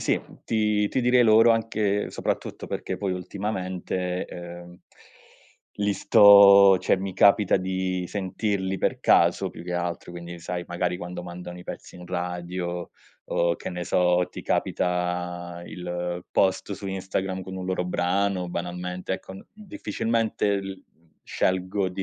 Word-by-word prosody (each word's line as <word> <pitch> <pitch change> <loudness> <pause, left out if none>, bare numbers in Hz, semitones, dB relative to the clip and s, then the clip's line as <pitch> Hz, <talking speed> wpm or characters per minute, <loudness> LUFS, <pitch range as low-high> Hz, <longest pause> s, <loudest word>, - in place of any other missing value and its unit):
sì, - - +1 0.3
ti 105 -2 +1
ti 130 - 0
direi 125 0 +5
loro 115 0 +6
anche 110 -3 0
soprattutto - - -3
perché - - -4
poi 100 -2 -2
ultimamente, 90 -1 -3
ehm, 85 0 -10 1.0
li 105 0 +1
sto 100 -2 +8
cioè - - +2
mi 95 0 -5
capita 100 +1 +5
di 95 0 -2
sentirli 95 0 -2
per - - 0
caso - - +3
più - - -10
che 90 - -4
altro, 90 0 -3
quindi 85 0 -8
sai 90 +1 -4
magari 90 0 -1
quando 90 0 -6
mandano 90 0 -8
i 90 - -11
pezzi - - -9
in 90 0 -11
radio 90 0 -4 0.4
o 85 0 +1
che - - -6
ne 90 -1 -4
so, 90 0 +2
ti - - -8
capita 90 -1 -2
il 90 0 -5
post 95 +1 +1
su 100 0 -7
Instagram 95 0 -3
con 95 +1 -8
un 95 - -5
loro 95 -1 -1
brano, 90 +1 0
banalmente 90 +1 -4
ecco, 95 - -9
n 95 - -12
difficilmente 115 - -1
l 95 -1 -8 0.4
scelgo 95 +1 0
di 95 +1 -5
90 Hz, 145 wpm, -25 LUFS, 90-100 Hz, 1.0 s, sto